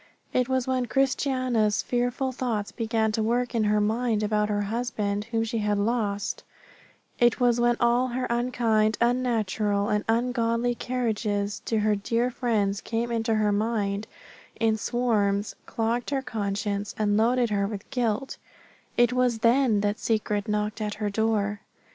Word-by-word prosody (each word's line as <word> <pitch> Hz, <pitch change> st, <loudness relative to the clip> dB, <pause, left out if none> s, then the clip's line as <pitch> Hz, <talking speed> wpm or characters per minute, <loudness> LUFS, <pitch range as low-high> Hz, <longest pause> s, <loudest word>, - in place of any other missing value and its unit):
It 250 Hz, 0 st, +1 dB
was 260 Hz, -1 st, +1 dB
when 255 Hz, -1 st, 0 dB
Christiana's 255 Hz, -4 st, +1 dB
fearful 245 Hz, +2 st, -1 dB
thoughts 235 Hz, -5 st, -2 dB
began 225 Hz, -2 st, 0 dB
to 220 Hz, -, -1 dB
work 240 Hz, +3 st, 0 dB
in 225 Hz, -2 st, +1 dB
her 210 Hz, 0 st, +3 dB
mind 220 Hz, +1 st, 0 dB
about 210 Hz, 0 st, +1 dB
her 205 Hz, 0 st, 0 dB
husband 210 Hz, -2 st, -2 dB
whom 225 Hz, -1 st, -1 dB
she 225 Hz, 0 st, -2 dB
had 210 Hz, -1 st, 0 dB
lost 205 Hz, -2 st, -1 dB, 0.8 s
it 240 Hz, 0 st, +4 dB
was 245 Hz, -1 st, +3 dB
when 240 Hz, 0 st, +3 dB
all 240 Hz, +2 st, +3 dB
her 255 Hz, +1 st, -2 dB
unkind, 235 Hz, -3 st, +1 dB
unnatural, 220 Hz, -4 st, +1 dB
and 210 Hz, 0 st, +1 dB
ungodly 235 Hz, 0 st, +1 dB
carriages 215 Hz, -5 st, -2 dB
to 225 Hz, -, 0 dB
her 210 Hz, 0 st, +2 dB
dear 230 Hz, +5 st, 0 dB
friend 210 Hz, -5 st, 0 dB
came 235 Hz, +1 st, -2 dB
into 225 Hz, -1 st, 0 dB
her 215 Hz, -1 st, +2 dB
mind 205 Hz, -1 st, -1 dB, 0.5 s
in 225 Hz, -1 st, +3 dB
swarms, 210 Hz, -3 st, 0 dB
clogged 230 Hz, +2 st, -1 dB
her 275 Hz, -2 st, -1 dB
conscience, 205 Hz, -3 st, -3 dB
and 205 Hz, -1 st, +1 dB
loaded 235 Hz, +1 st, +2 dB
her 200 Hz, -1 st, +1 dB
with 205 Hz, -1 st, -7 dB
guilt 245 Hz, 0 st, -1 dB, 0.6 s
it 240 Hz, 0 st, +4 dB
was 250 Hz, -2 st, +2 dB
then 235 Hz, -3 st, +4 dB
that 205 Hz, +2 st, -1 dB
Secret 210 Hz, -1 st, -1 dB
knocked 210 Hz, +1 st, -1 dB
at 210 Hz, -1 st, -2 dB
her 210 Hz, -1 st, -2 dB
door. 210 Hz, -1 st, 0 dB
225 Hz, 155 wpm, -26 LUFS, 210-245 Hz, 0.8 s, it